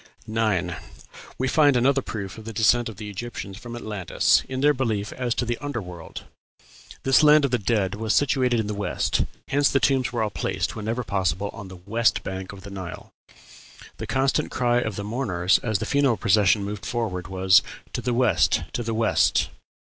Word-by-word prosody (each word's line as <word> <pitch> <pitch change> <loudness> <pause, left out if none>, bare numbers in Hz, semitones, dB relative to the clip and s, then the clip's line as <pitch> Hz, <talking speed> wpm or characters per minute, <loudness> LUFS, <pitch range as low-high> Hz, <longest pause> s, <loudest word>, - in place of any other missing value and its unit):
9. 105 -6 0 0.6
We 130 - 0
find 145 -2 +4
another 135 +3 +3
proof 105 -3 -6
of 110 - -12
the 115 - -6
descent 115 +2 +3
of 110 - -10
the 105 0 -7
Egyptians 105 -1 -6
from 120 0 -8
Atlantis 105 -6 +1
in 130 0 -3
their 150 +1 +5
belief 110 -6 -2
as 125 -2 -2
to 125 - -1
the 120 0 -2
"under 145 -4 -4
world." 90 -4 -9 0.8
This 135 -1 +5
land 150 -1 +6
of 135 - -1
the 125 - +1
dead 100 -3 0
was 110 0 -1
situated 130 -4 +2
in 110 - -1
the 105 - -3
West 105 0 -1 0.2
hence 140 +1 +3
the 135 - +2
tombs 135 -2 +2
were 120 -2 -1
all 105 - -2
placed, - - -2
whenever 115 +4 -3
possible, 95 -1 -1
on 100 -3 -9
the 95 - -10
west 115 +3 +1
bank 95 0 -5
of 100 -1 -11
the 100 +1 -10
Nile. 95 -3 -8 0.9
The - - -6
constant 135 +1 +1
cry 120 -1 +1
of 110 -4 -3
the 100 - -4
mourners 100 -6 +1
as 110 -3 -1
the - - -4
funeral 140 -5 +2
procession 105 -1 +3
moved 105 +1 -5
forward 100 -8 -3
was, 95 +1 +4 0.3
"To 125 - -2
the 125 +1 -1
west; 125 -1 +3
to - - -2
the 115 -1 -3
west." 115 -1 +2
110 Hz, 195 wpm, -24 LUFS, 100-125 Hz, 0.9 s, land